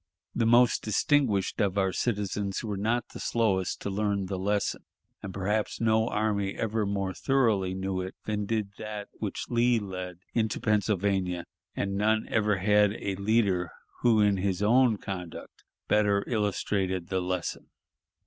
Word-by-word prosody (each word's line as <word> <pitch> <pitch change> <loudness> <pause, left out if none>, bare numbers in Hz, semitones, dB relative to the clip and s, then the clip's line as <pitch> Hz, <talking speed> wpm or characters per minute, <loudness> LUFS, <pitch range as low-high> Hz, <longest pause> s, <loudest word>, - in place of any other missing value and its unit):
The 115 -2 +1
most 120 +1 +5
distinguished 110 -2 +1
of 100 -1 0
our 95 -1 +1
citizens 100 -3 -2
were 105 -3 -3
not 115 +5 -1
the - - -9
slowest 100 -6 0
to 100 - -3
learn 100 -1 0
the 95 0 -4
lesson, 100 +2 -1 0.4
and 100 - -6
perhaps 105 +3 -1
no 110 0 +2
army 105 -2 0
ever 110 -1 -1
more 100 -2 -1
thoroughly 110 -9 +1
knew 95 0 -2
it 95 +1 -6
than 105 -1 -2
did 110 -3 -1
that 105 -1 -6
which 105 -3 -3
Lee 120 0 +3
led 95 -4 -5 0.2
into 110 -3 0
Pennsylvania, 100 -4 0 0.3
and 100 -1 -2
none 110 +2 +2
ever 105 -2 +2
had 105 +1 +3
a 100 -3 -3
leader 100 -4 +1 0.3
who 115 -3 +4
in 100 -1 +3
his 95 0 -1
own 120 +1 +4
conduct 90 -4 -7 0.2
better 105 -1 +3
illustrated 100 -5 -1
the 95 -1 0
lesson. 90 -1 -3
100 Hz, 150 wpm, -28 LUFS, 95-110 Hz, 0.4 s, most